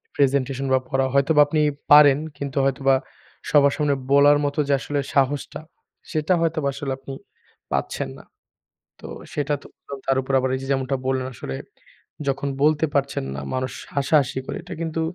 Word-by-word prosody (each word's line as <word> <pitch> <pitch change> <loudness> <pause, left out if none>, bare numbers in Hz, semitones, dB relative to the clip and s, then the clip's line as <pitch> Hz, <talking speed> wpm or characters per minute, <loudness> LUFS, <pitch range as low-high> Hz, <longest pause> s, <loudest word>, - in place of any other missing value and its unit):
Presentation 135 -1 +1
বা 130 - +4
পড়া 135 -1 +1
হয়তোবা 140 +2 +4
আপনি 155 +1 +1 0.3
পারেন 145 -1 +8 0.2
কিন্তু 140 0 -5
হয়তোবা 135 0 +2 0.5
সবার 140 -1 +5
সামনে 150 -2 +1 0.2
বলার 145 +1 +6
মত 145 0 -2
যে 140 - +2
আসলে 145 +3 -3
সাহসটা 140 0 0 0.5
সেটা 155 +2 +1
হয়তোবা 160 -3 0
আসলে 135 0 -4
আপনি 135 0 -9 0.6
পাচ্ছেন - - -2
না। - - -13 0.8
তো - - -10 0.3
সেটা 145 0 -1
তো - - -13 0.4
তার 135 0 +2
উপর 135 +1 -5
আবার 130 0 0
এইযে 135 0 -6
যেমনটা 135 0 0
বললেন 130 -1 0
আসলে 65 - -6 0.7
যখন 140 +1 -1 0.2
বলতে 155 +1 +3
পারছেন 140 - 0
না 70 - -5
মানুষ 130 0 -2 0.2
হাসাহাসি 140 -1 +2
করে। - - -5
এটা 180 +1 -8
কিন্তু 165 0 -2
140 Hz, 160 wpm, -23 LUFS, 135-145 Hz, 0.8 s, পারেন